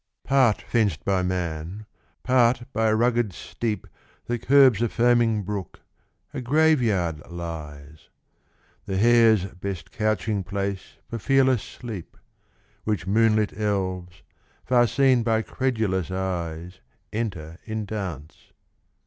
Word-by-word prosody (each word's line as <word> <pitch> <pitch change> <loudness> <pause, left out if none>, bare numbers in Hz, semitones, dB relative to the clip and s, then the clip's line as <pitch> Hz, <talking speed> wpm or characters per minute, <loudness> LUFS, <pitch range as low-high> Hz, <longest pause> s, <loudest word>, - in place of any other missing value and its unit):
F.] - - -18
Part 130 -6 +4
fenced 105 -10 0
by 95 -2 +2
man, 90 +2 -3 0.4
part 125 -1 +3
by 110 +1 +1
a 110 - +3
rugged 120 -3 +1
steep 105 +3 -4 0.4
That 120 -1 -3
curbs 130 -5 +5
a 120 - +1
foaming 115 -3 +2
brook, 100 -1 -5 0.5
a 135 - -4
Grave 155 +3 +3
yard 90 -9 0
lies; 80 -3 -8 0.8
The 95 - -2
hare's 115 -2 +5
best 95 -3 -7
couching 110 -2 -1
place 100 +1 -4
for 115 - -5
fearless 130 -1 +3
sleep; 110 -8 -9 0.7
Which 105 -5 -2
moonlit 110 +1 +2
elves, 95 -4 -3 0.4
far 120 -1 +4
seen 130 +1 +3
by 110 -1 +1
credulous 110 -10 -1
eyes, 90 -2 -4 0.3
Enter 90 -8 -4
in 110 -1 -4
dance. 95 -8 -7
105 Hz, 120 wpm, -24 LUFS, 90-120 Hz, 0.8 s, curbs